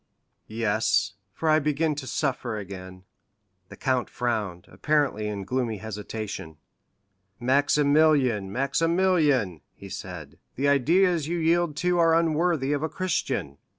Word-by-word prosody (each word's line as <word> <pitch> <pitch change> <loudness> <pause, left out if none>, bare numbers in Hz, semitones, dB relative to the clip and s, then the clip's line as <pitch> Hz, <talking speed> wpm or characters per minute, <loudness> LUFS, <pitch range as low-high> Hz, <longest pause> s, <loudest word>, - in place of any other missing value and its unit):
"Yes; 110 -1 +1 0.2
for 160 - -4
I 155 0 +5
begin 150 +1 0
to 140 -2 -6
suffer 125 -6 -2
again." 95 -2 -9 0.7
The - - -10
count 130 -2 0
frowned, 105 -8 -2
apparently 145 -8 0
in 100 -2 -4
gloomy 120 +1 -2
hesitation. 105 -5 -6 0.8
"Maximilian, 140 -4 +3
Maximilian," 145 - +1
he 100 - -11
said, 90 -7 -8 0.2
"the 140 +3 0
ideas 165 +4 +3
you 175 +1 -1
yield 165 -1 +1
to 180 -1 +2
are 165 -1 +5
unworthy 165 -3 +1
of 145 - -1
a 160 - -1
Christian." 135 - -2
135 Hz, 120 wpm, -26 LUFS, 105-160 Hz, 0.8 s, I